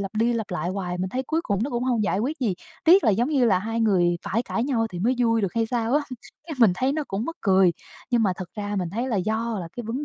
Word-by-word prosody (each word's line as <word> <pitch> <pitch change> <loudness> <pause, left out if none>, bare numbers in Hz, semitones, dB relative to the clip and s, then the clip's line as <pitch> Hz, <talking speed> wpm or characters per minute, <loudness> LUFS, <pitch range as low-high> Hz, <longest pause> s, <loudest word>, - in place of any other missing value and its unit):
lặp 195 +1 -5
đi 230 +3 +2
lặp 225 -3 -3
lại 175 -1 -2
hoài, 180 -2 -3
mình 185 +1 -1
thấy 255 +7 -2
cuối 320 +5 -1
cùng 200 - -1
nó 275 - -2
cũng 240 0 -2
hông 245 -4 +1
giải 195 -1 0
quyết 280 +9 -2
gì. 220 -7 +1 0.3
Tiếc 360 +3 +6
là 225 - +5
giống 230 +6 +1
như 280 -5 +2
là 200 -6 +4
hai 225 +4 -3
người 180 -6 +3
phải 225 +4 -1
cãi 230 -1 -2
nhau 240 -5 0
thì 180 - -6
mới 235 +8 +1
vui 230 -2 +2
được 195 -4 -2
hay 230 -1 +1
sao 235 +1 -1
á. 295 - +4 0.5
Cái 320 - -5
mình 225 -6 +6
thấy 260 +8 0
nó 305 0 -2
cũng 200 +3 -2
mắc 330 +4 -5
cười. 190 -3 +4 0.4
Nhưng 240 -2 +3
mà 195 -4 +2
thật 185 -3 -7
ra 205 0 -4
mình 180 -3 -2
thấy 235 +7 -2
là 230 - 0
do 220 +3 -1
là 170 - -6
cái 240 - -5
vấn 255 +6 -3
225 Hz, 300 wpm, -24 LUFS, 195-245 Hz, 0.5 s, Tiếc